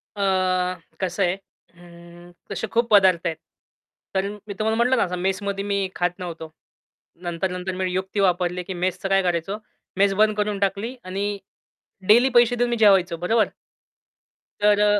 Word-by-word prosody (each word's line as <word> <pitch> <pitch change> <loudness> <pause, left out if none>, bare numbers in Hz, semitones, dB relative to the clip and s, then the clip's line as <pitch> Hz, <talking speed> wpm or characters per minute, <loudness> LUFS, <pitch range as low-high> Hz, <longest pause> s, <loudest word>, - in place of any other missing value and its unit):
अ, 200 - -4 0.8
कसं 190 +1 0
आहे, 175 0 +2
अं, 175 -2 -17 0.2
तसे 220 - -3
खूप 235 0 +2
पदार्थ 185 -4 +5
आहेत. 160 -1 -3 0.8
तर 190 +1 +1 0.2
मी 200 - -5
तुम्हाला 220 +3 0
म्हटलं 250 +2 +3
ना - - +3
आता 180 -1 -3
मेसमध्ये 195 +2 -2
मी 200 -1 0
खात 175 +1 -1
नव्हतो. 165 -3 -7 0.7
नंतर-नंतर 180 +2 -3
मी 185 0 -1
युक्ती 190 +2 -2
वापरली 180 -1 +1
की 190 - -6
मेसचं 185 +2 -2
काय 195 0 +4
करायचो? 180 +3 -1 0.4
मेस 195 0 +4
बंद 215 -1 +4
करून 205 -1 -1
टाकली 200 +5 -1
आणि 195 +2 -3 0.8
डेली 240 +5 +6
पैसे 240 0 +5
देऊन 245 0 +1
मी 240 - +1
जेवायचो. 190 -5 +4
बरोबर? 220 +6 +2 1.1
तर 205 0 +4
अ, 205 0 +4
195 Hz, 155 wpm, -23 LUFS, 180-210 Hz, 1.1 s, डेली